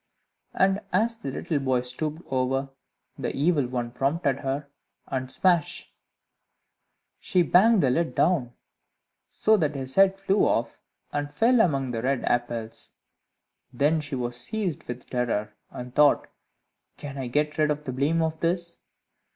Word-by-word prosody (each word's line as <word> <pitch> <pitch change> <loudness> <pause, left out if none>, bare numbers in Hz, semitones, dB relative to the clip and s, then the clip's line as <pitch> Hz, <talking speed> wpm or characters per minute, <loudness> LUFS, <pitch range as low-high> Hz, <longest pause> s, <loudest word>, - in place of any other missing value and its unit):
And 195 +1 +3
as 225 +5 +2
the 140 - -5
little 145 +3 -2
boy 130 -2 +1
stooped 150 +6 -4
over, 135 +1 0 0.5
the - - -3
Evil 145 -2 +2
One 120 -1 -3
prompted 135 +2 0
her, 140 +1 -3 0.4
and 130 -1 -4
smash! 175 -5 +1 1.3
she 180 - +2
banged 195 +3 +5
the 130 - +3
lid 165 +5 0
down, 150 -8 +2 0.8
so 220 0 +3
that 155 -5 0
his 130 -1 -2
head 195 0 +4
flew 195 +1 +1
off 115 0 +1 0.3
and 145 0 -2
fell 230 +9 +4
among 135 - +1
the 115 -2 -3
red 130 +1 0
apples. 120 -2 -2 0.8
Then 145 +5 +2
she 145 -2 -4
was 120 -1 -3
seized 175 - -3
with 120 0 -7
terror, 115 -4 -1 0.2
and 125 0 -8
thought, 150 0 +4 0.7
"Can 140 -1 -7
I 130 - -3
get 150 +4 0
rid 155 0 +3
of 150 0 -1
the 130 - -4
blame 150 +6 +1
of 160 0 -2
this?" 170 0 -1
145 Hz, 150 wpm, -26 LUFS, 125-170 Hz, 1.3 s, banged